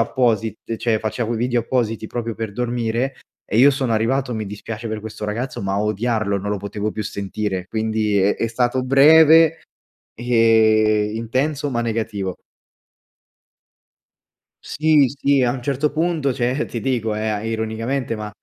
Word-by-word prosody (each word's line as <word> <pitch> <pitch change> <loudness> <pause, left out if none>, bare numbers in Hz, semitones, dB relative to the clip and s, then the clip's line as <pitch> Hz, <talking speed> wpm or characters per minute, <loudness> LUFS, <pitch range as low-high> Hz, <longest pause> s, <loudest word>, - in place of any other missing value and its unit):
apposit 115 -2 0
cioè, 115 -2 +1
faceva 110 +1 -3
quei 115 -1 -2
video 120 0 +1
appositi 115 -2 -2
proprio 115 -2 -4
per 110 -1 -5
dormire 120 +2 -2 0.3
e - - -2
io 135 +4 +7
sono 130 -3 -1
arrivato, 125 +3 0
mi 110 -1 -3
dispiace 110 +3 -7
per 110 0 -3
questo 110 0 -7
ragazzo, 115 +2 -4
ma 95 0 -1
a 100 - 0
odiarlo, 105 -1 0
non 100 +1 -4
lo 105 - 0
potevo 105 +2 -4
più 110 - -4
sentire 100 -2 -4
quindi 110 -2 0
è 95 +2 +3
è 115 - -1
stato 120 +2 0
breve 160 +4 +6 0.5
e 110 -3 +3
intenso 135 +6 -1
ma 120 -2 -1
negativo. 110 -5 -3 2.3
Sì, 150 -2 +3
sì 140 -1 +2
a 120 - +1
un 125 -1 -6
certo 140 +3 -1
punto 160 -3 0
cioè, 125 +3 -1
ti 115 - -5
dico 115 -4 -1
eh, 110 0 -2
ironicamente 115 +3 -2
ma 105 0 -5
115 Hz, 155 wpm, -20 LUFS, 110-130 Hz, 2.3 s, io